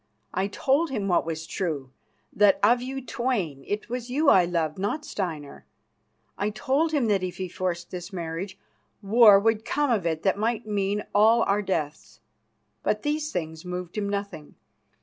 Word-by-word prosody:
I 190 +1 0
told 275 +10 +1
him 210 -7 -2
what 175 -3 +2
was 160 0 -4
true: 150 -10 -3 0.4
that, 205 -1 +5
of 240 +4 +5
you 265 +1 -5
twain, 220 - -2
it 205 +1 -3
was 245 0 -5
you 285 +4 +3
I 180 -2 +6
loved, 170 -1 -1
not 255 +11 -2
Steinar. 160 -7 -5 0.7
I 205 - +1
told 270 +9 0
him 290 -6 +1
that 205 -3 +2
if 185 -1 -4
he 185 - -3
forced 175 -1 -4
this 180 +1 -6
marriage, 180 +2 -5 0.5
war 210 0 +7
would 220 +1 +1
come 290 +2 0
of 200 -7 +1
it 160 -1 -2
that 195 0 +1
might 225 +1 -1
mean 205 0 -1
all 220 +3 +5
our 200 +1 +1
deaths. 160 -7 -4 0.6
But 210 - -1
these 300 +1 -1
things 160 -2 -4
moved 180 -1 -6
him 205 -2 -2
nothing. 200 -7 -5
200 Hz, 170 wpm, -26 LUFS, 175-235 Hz, 0.7 s, war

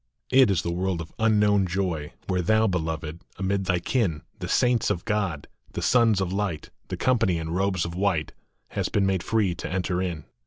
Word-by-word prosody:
It 130 -3 +6
is 90 -3 +1
the 85 - -2
world 90 0 -1
of 85 0 -8
unknown 105 -3 +3
joy, 85 -5 -2
Where 90 -1 0
thou, 110 +5 +3
Beloved, 80 -4 -2 0.2
amid 95 0 -1
thy 90 -1 +2
kin, 90 - 0 0.2
The - - -4
saints 120 -2 +2
of 90 -4 -2
God, 100 -8 -1 0.3
the - - -3
Sons 115 -5 +4
of 95 -1 -1
Light, 95 -6 -2 0.2
The - - -4
company 110 -9 +2
in 80 0 -4
robes 95 -1 0
of 85 - -5
white, 90 -5 0 0.4
Hast - - -3
been 100 - +3
made 95 -2 +1
free 105 -1 +1
to - - -6
enter 90 -1 -1
in. 85 -5 -3
95 Hz, 195 wpm, -25 LUFS, 85-105 Hz, 0.4 s, It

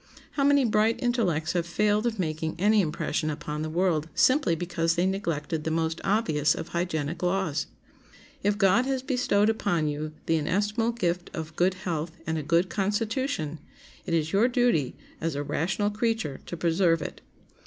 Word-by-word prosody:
How 280 - -1
many 280 -1 +4
bright 220 0 +2
intellects 215 - 0
have 170 -1 -1
failed 210 +5 +1
of 225 -2 -2
making 160 -3 -2
any 210 +4 +4
impression 155 -1 -1
upon 150 0 -4
the 155 - -3
world 165 -2 +1
simply 260 - +4
because 165 -1 0
they 175 - +2
neglected 165 -5 -2
the 160 - -1
most 160 0 -1
obvious 175 -8 +2
of - - -6
hygienic 170 -2 -2
laws! 175 -4 0 0.7
If 205 -2 +1
God 215 +5 +4
has 265 -1 -1
bestowed 250 -6 +2
upon 190 -8 +1
you 150 +1 -3
the 165 - +2
inestimable 210 +8 0
gift 180 -6 -1
of 160 -1 -6
good 180 +2 +2
health 165 -3 -3
and 160 0 -1
a - - -2
good 170 +5 +2
constitution, 205 - -1 0.5
it 165 - +1
is 160 -1 -1
your 210 +5 +4
duty, 245 - +1 0.3
as 165 -2 -1
a 145 - -2
rational 185 +8 -1
creature, 220 - -1
to 175 - -5
preserve 165 0 +2
it. - - -7
175 Hz, 170 wpm, -27 LUFS, 160-210 Hz, 0.7 s, many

